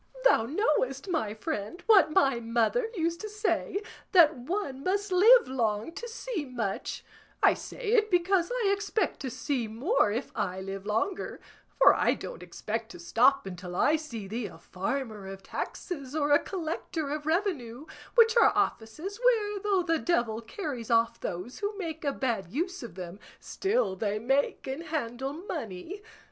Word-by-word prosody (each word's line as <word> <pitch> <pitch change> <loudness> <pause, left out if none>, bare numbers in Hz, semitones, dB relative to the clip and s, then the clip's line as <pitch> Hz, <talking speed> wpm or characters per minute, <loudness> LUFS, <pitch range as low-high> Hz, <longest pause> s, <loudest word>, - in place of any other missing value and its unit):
Thou 225 - +5
knowest, 275 - 0
my 220 - -1
friend, 310 - -4
what 405 -8 +6
my 270 -5 +3
mother 235 - +1
used 335 -1 -1
to 430 - -5
say, 405 -1 -1 0.3
that 325 -4 +7
one 275 0 -4
must 400 +1 0
live 445 +7 +7
long 225 0 -1
to 470 +8 -7
see 460 -6 -4
much; 240 -7 -4 0.4
I - - +7
say 465 -4 -5
it 435 -2 +4
because 355 +1 +2
I 475 -5 +1
expect 405 -2 -1
to 265 - -4
see 250 -1 -2
more 235 - +1
if 235 +6 -3
I 190 -4 -2
live 195 +1 -6
longer; 225 - -1 0.4
for - - +8
I - - +2
don't - - -8
expect - - -4
to - - -11
stop 275 -4 +3
until 180 -1 -7
I 295 - +4
see 235 -10 -5
thee 220 +2 -3
a 175 - -12
farmer 210 +3 -4
of 195 0 -8
taxes 280 -6 -5
or 295 -2 +1
a 290 - +7
collector 320 -4 -4
of 300 0 -4
revenue, 315 - -1 0.3
which 460 -1 +6
are 465 - +7
offices 310 - -2
where, 425 -4 +3
though 390 -2 +1
the 330 -2 +1
devil 235 -11 0
carries 245 - -5
off 230 0 +2
those 180 +8 -5
who 410 0 -3
make 325 -5 -5
a 285 - +1
bad 235 -10 -2
use 360 +6 -2
of 230 -7 -8
them, 180 +1 -7 0.2
still 390 - 0
they 205 +1 -1
make 270 +6 0
and 265 +4 -4
handle 270 -3 -3
money. 320 - -6
290 Hz, 165 wpm, -29 LUFS, 230-380 Hz, 0.4 s, for